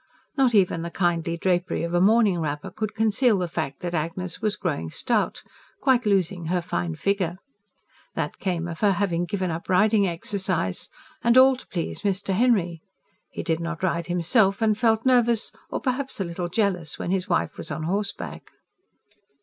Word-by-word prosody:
Not 260 -5 +3
even 185 -4 +3
the 170 - -4
kindly 170 -1 0
drapery 175 -1 0
of 170 +1 -3
a 175 - +3
morning 210 -2 +4
wrapper 150 -2 -3
could 215 -1 -4
conceal 220 +1 +3
the 180 -1 -1
fact 160 -5 -4
that 175 -1 -4
Agnes 170 +2 -3
was 215 -1 0
growing 150 - -3
stout - - -1 0.4
quite 255 -4 +2
losing 185 -3 +1
her 180 +2 +1
fine 85 - -3
figure. 185 - -1 0.8
That 150 -2 -3
came 175 -3 -2
of 165 -1 -6
her 205 -2 +4
having 175 -3 0
given 185 0 -2
up 165 +3 -6
riding 205 +2 +4
exercise. 175 - -2 0.3
And 235 +2 +4
all 260 +1 +7
to 255 - -14
please 170 -3 -4
Mr. 195 -1 -1
Henry. 185 -7 +2 0.5
He - - -6
did 165 -2 0
not 170 +1 -5
ride 170 -2 0
himself, 190 +4 +2
and 220 -1 +3
felt 225 +1 +2
nervous 240 -3 +3 0.2
or - - -2
perhaps 265 -1 -2
a - - +1
little 175 0 -4
jealous 180 -7 -1
when 175 - -3
his 190 +1 -1
wife 175 - 0
was - - -5
on 155 - -4
horseback. 200 +5 -3
185 Hz, 175 wpm, -25 LUFS, 170-215 Hz, 0.8 s, all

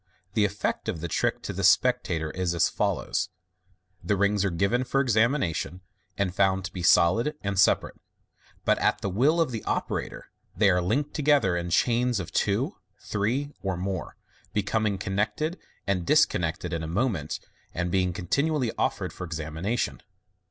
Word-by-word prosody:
The 105 - +3
effect 100 +1 -2
of 80 - -3
the 85 - -3
trick - - -1
to - - -4
the - - -4
spectator 80 -2 +3
is 90 -2 -1
as 85 - +3
follows: - - -1 0.4
— 95 -1 -39
The 100 +4 +1
rings 100 0 +2
are 100 - +2
given 100 +9 +1
for 130 +2 0
examination, 110 - +1 0.4
and 95 -3 0
found 95 -1 +2
to - - -7
be 90 - -5
solid 95 - +4
and 100 -1 -1
separate; 100 - +2 0.6
but - - +3
at - - +1
the 100 - -2
will 140 - +3
of 165 -5 +2
the 110 -3 -4
operator - - -3 0.3
they 100 -3 +5
are 90 0 +2
linked 140 +11 0
together 145 - +3
in 85 0 -2
chains 120 +5 +2
of 90 - -6
two, - - 0 0.2
three, 125 +8 -2
or 95 -2 -2
more, 95 0 -4 0.4
becoming 105 0 0
connected 105 - -1 0.3
and 100 -3 0
disconnected 85 0 +2
in 85 - -2
a 80 - -4
moment, 90 - -1 0.3
and 85 +1 -2
being 90 -1 +2
continu 100 - 0
ally 120 -4 0
offered - - -1
for - - -7
examination. 80 +7 -3
100 Hz, 165 wpm, -27 LUFS, 90-115 Hz, 0.6 s, they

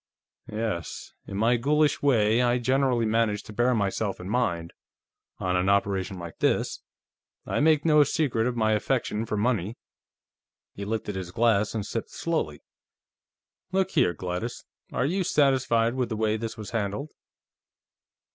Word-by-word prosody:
"Yes. 105 -7 -4
In 100 - -5
my 115 +3 +3
ghoulish 150 +4 +2
way, 115 -4 +3
I 120 0 +3
generally 125 -1 +2
manage 110 -1 +1
to 105 - -11
bear 120 +3 +2
myself 100 -1 -1
in 90 - -7
mind, 85 -8 -1 0.6
on 90 -1 -1
an 90 +1 +2
operation 100 -1 +1
like 85 -2 -9
this. - - +1 0.6
I - - -1
make 155 0 +3
no 150 -2 +6
secret 130 -6 0
of 125 - -2
my 110 -2 +2
affection 110 0 0
for 105 - -2
money." 110 -2 0 1.0
He 100 - -6
lifted 105 -1 -3
his 95 -2 -5
glass 110 +1 +2
and 105 -3 -2
sipped - - -4
slowly. - - -2 1.1
"Look 190 0 +1
here, 125 - +2
Gladys; 90 +8 -4 0.3
are - - 0
you 185 +6 0
satisfied 130 -7 +2
with 125 -2 -1
the 110 - -3
way 110 0 +1
this 110 0 -5
was 105 -2 -7
handled?" 115 +6 -2
115 Hz, 150 wpm, -26 LUFS, 100-125 Hz, 1.1 s, no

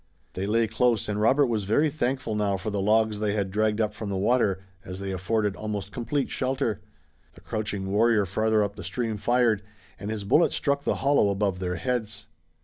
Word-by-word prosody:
They 95 +2 -3
lay 115 +2 +3
close 115 0 +1
and 105 0 -2
Robert 135 +6 +4
was 110 -5 -1
very 145 +9 +2
thankful 130 -5 -1
now 105 -2 0
for 100 +3 -4
the 100 -1 -1
logs 110 +1 +2
they 105 -1 0
had 100 -2 -1
dragged 110 +1 +1
up 105 -1 0
from 105 -1 -6
the 100 - -2
water, 100 -2 +1 0.2
as 90 +1 -7
they 100 0 -4
afforded 100 +2 0
almost 105 -2 -4
complete 125 +5 -2
shelter. 130 -4 -1 0.5
The - - -16
crouching 100 -3 -3
warrior 110 0 +3
farther 110 +3 +1
up 100 0 -3
the 100 - -7
stream 110 +4 -2
fired, 120 -1 +2 0.4
and 100 +2 -5
his 110 -2 -3
bullet 150 +12 +3
struck 140 -1 0
the - - +1
hollow 140 -7 +4
above 100 -2 0
their 90 -1 -2
heads. 110 -1 -3
105 Hz, 200 wpm, -26 LUFS, 100-115 Hz, 0.5 s, Robert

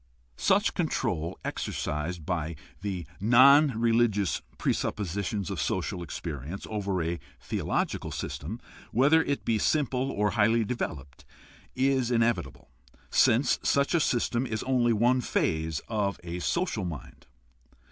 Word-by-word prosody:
Such - - +2
control 80 +2 -1
exercised 75 +2 -3
by 85 -2 -2 0.3
the 95 -4 -3
non 130 +4 +6
religious 115 - +2 0.2
presuppositions 100 0 -2
of - - -2
social 90 - -2
experience 80 +1 -6
over 100 -4 -1
a 85 +1 -2 0.2
theological - - -2
system, 100 +11 -5 0.3
whether 145 +7 +5
it 140 -3 -2
be 110 -2 +1
simple 135 0 +1
or 105 -2 +1
highly 115 +1 +3
developed, 75 - -5 0.5
is 130 -2 +2
inevitable, 115 -1 0 0.4
since 120 +4 +4
such 140 +3 +2
a 170 - +4
system 120 -2 0
is 110 -2 -3
only 125 -2 +2
one 120 +4 +3
phase 80 -8 -1
of 100 -4 -1
a 85 0 -5
social 170 - -1
mind. 80 -7 -8
110 Hz, 120 wpm, -28 LUFS, 85-125 Hz, 0.5 s, non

